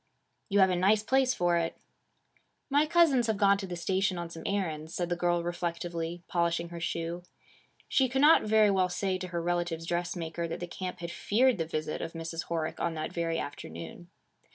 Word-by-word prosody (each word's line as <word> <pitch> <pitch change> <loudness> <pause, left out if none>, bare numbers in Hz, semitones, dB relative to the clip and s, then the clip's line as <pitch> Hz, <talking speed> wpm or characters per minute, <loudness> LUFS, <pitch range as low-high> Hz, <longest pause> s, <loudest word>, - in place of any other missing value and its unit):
'You 200 0 +4
have 190 -1 +5
a - - +2
nice 200 +4 +3
place 260 +2 +2
for 175 -1 +2
it.' 165 0 -2 0.9
'My 290 +2 +4
cousins 300 -8 +4
have 220 -2 0
gone 200 -1 +4
to 195 - -5
the 180 - -4
station 190 +2 0
on 170 -1 -5
some 165 - -8
errands,' 165 -5 -2
said 175 -1 -1
the 175 - +1
girl 175 0 +1
reflectively, 170 0 -3
polishing 170 -1 0
her 170 0 -7
shoe. 170 +1 -3 0.7
She 265 -2 +2
could 265 +2 0
not 305 +3 +7
very 215 -1 +4
well 185 -2 +2
say 185 +1 -1
to 185 - -5
her 170 -1 -3
relative's 175 -1 -1
dressmaker, 170 -1 -2
that 165 - -5
the 175 - -3
camp 180 0 -6
had 170 0 -4
feared 240 +2 +2
the 165 - 0
visit 155 -1 -3
of 165 - -5
Mrs. 165 0 -5
Horick 165 -2 -3
on 170 -1 -1
that 155 0 -4
very 165 -1 -1
afternoon. 85 - -7
175 Hz, 200 wpm, -30 LUFS, 170-195 Hz, 0.9 s, not